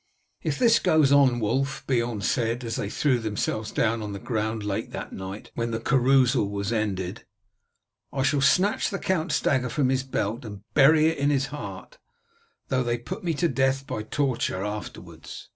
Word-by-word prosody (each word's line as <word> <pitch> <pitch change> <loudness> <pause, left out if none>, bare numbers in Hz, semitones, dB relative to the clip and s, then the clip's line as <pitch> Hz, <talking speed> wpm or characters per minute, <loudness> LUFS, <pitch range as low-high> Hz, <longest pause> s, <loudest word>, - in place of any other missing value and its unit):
"If - - -2
this 235 -2 +5
goes 155 -3 +3
on, 135 -4 +5
Wulf," 135 +5 -1
Beorn 120 -4 0
said 115 +4 0
as 115 -1 -3
they 100 - -3
threw 130 +1 +1
themselves 110 0 -2
down 115 0 0
on 105 -1 -5
the 100 - -5
ground 110 -1 -2
late 100 -1 -3
that - - -6
night, 95 +2 -7
when 115 0 -2
the 115 -1 -2
carousal 130 -2 +3
was 100 +2 -2
ended, 100 -2 -2 0.9
"I 135 - -1
shall 140 +1 +2
snatch 185 +9 +3
the 195 - -3
count's 185 -2 0
dagger 130 -3 +1
from 135 0 +1
his 130 0 +1
belt 120 -2 -3
and 105 -3 -9
bury 155 +2 +6
it 160 - -3
in 140 +1 +2
his 135 -2 +1
heart, - - -8 0.7
though 130 -1 +1
they 120 -1 0
put 180 +12 -7
me 170 -2 -1
to 170 +4 +1
death 135 -2 0
by 110 - -4
torture 115 -5 -1
afterwards." 105 0 -8
125 Hz, 180 wpm, -25 LUFS, 110-140 Hz, 0.9 s, bury